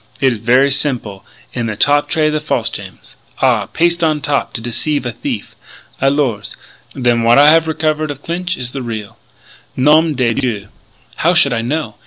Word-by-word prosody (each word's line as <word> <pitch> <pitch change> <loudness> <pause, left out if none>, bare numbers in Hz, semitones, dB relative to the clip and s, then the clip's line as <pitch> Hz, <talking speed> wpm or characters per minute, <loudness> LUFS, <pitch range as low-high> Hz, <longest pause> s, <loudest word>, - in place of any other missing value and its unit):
It 135 -2 +3
is 115 - -7
ver' 125 +5 +3
simple. 120 -8 -1 0.3
In 120 -2 -2
the 110 - -3
top 145 +6 +2
tray 155 -1 +1
the 155 - 0
false 130 -7 -2
gems. 95 -1 -10 0.2
Ah! - - +2
Paste 170 0 0
on 155 -2 +2
top 145 -1 -1
to - - -2
deceive 130 +5 -2
a 120 - -2
thief!... - - -6 0.5
Alors.... 130 -7 0 0.4
Then 120 -3 +1
what 115 +2 +4
I 145 +1 +7
have 160 +1 +4
recover 155 -1 -1
of 145 -2 -7
Clinch 180 +2 -3
is 125 -1 -5
the 135 - -5
real!... 110 -4 -6 0.6
Nom 155 +3 +3
de 120 -3 +1
Dieu!... 110 -6 -3 0.5
How 175 +3 +2
should 140 -6 +4
I 115 - -1
know? 120 -3 -3
135 Hz, 185 wpm, -16 LUFS, 115-155 Hz, 0.6 s, I